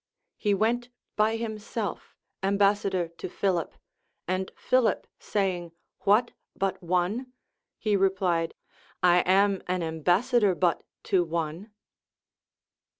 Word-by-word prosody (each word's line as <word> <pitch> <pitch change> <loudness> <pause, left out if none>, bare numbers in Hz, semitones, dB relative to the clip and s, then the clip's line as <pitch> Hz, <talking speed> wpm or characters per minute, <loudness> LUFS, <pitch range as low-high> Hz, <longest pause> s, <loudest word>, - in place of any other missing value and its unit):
He 205 -2 +2
went 235 +4 0 0.3
by 215 +1 +2
himself 220 -1 -4 0.3
ambas 200 +1 +3
sador 175 -4 -1
to - - -5
Philip; 180 -3 -1 0.5
and 185 +1 -1
Philip 255 -2 +2
saying, 180 -4 -1 0.3
What! 220 +4 +3 0.2
but 195 -1 -1
one? 185 +9 -1 0.4
he 210 -2 +1
replied, 185 -4 +1 0.5
I 180 0 +6
am 195 +2 +3
an 180 -1 0
ambassador 180 +6 +2
but 175 -1 +1 0.2
to 185 -2 +2
one. 165 +4 -3
195 Hz, 105 wpm, -27 LUFS, 175-210 Hz, 0.5 s, I